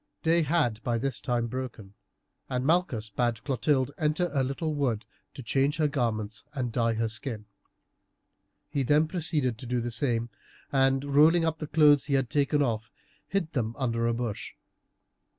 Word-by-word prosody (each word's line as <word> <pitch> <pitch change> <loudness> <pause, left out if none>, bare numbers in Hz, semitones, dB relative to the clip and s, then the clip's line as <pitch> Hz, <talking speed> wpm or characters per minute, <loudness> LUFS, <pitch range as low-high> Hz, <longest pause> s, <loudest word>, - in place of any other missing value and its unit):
Day 165 +1 +4
had 145 -8 +1
by 120 -1 0
this 135 +1 -3
time 120 -3 0
broken, 115 -5 -6 0.6
and 125 -1 -1
Malchus 135 - +1
bade 120 0 -1
Clotilde 135 -1 +1
enter 155 +2 +1
a 135 -2 +2
little 145 +4 -2
wood 125 -7 -1 0.3
to 135 - -8
change 135 +5 +1
her 155 -2 +3
garments 110 -6 -2
and 125 -3 -2
dye 115 0 +1
her 115 +1 0
skin. 110 -1 -4 1.2
He 140 - -1
then 150 +4 +3
proceeded 150 - -1
to 125 - -7
do 125 0 0
the 120 0 -3
same, 120 -2 0 0.4
and 135 0 +2
rolling 155 +4 +5
up 160 -1 -1
the 155 - -4
clothes 150 -2 +5
he 140 -1 +1
had 135 -3 0
taken 145 0 +2
off, 115 -3 -2 0.4
hid 190 -5 -1
them 115 -5 -2
under 115 -3 0
a 115 - +1
bush. 115 -4 -4
130 Hz, 170 wpm, -28 LUFS, 115-150 Hz, 1.2 s, rolling